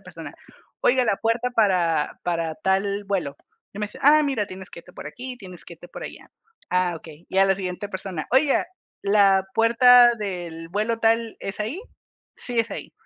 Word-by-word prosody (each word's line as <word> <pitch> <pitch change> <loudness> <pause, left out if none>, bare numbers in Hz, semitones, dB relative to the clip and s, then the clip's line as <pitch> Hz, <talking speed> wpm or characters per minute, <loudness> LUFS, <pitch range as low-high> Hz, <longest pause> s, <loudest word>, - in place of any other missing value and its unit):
persona: - - -10 0.5
"Oiga, 255 0 +3
la 220 - +1
puerta 230 +3 -1
para 180 -9 +1
para 165 -2 -2
tal 200 +1 0
vuelo", 175 -8 -2 0.4
y 195 - -10
me 210 - -1
decían: 210 - -11
"Ah, 305 +1 +7
mira, 265 -8 -1
tienes 190 +1 -10
que - - -11
irte - - -18
por - - -8
aquí, 250 +9 -6
tienes 185 -5 -12
que - - -12
irte 175 +2 -15
por - - -9
allá". - - -10 0.4
"Ah, 180 -1 +1
okey". 160 0 -14
Y 190 - -1
a 195 - +6
la 195 0 +2
siguiente 185 +1 -5
persona: 185 -4 -5
"Oiga, 270 +2 +3 0.4
¿la 200 -1 +4
puerta 240 +2 +6
del 175 -5 -5
vuelo 215 +5 -1
tal 225 0 +1
es 195 - -6
ahí? 235 - -3 0.6
'Sí, 240 -2 -1
es 230 - -4
ahí'". - - -7
200 Hz, 190 wpm, -23 LUFS, 180-230 Hz, 0.6 s, Ah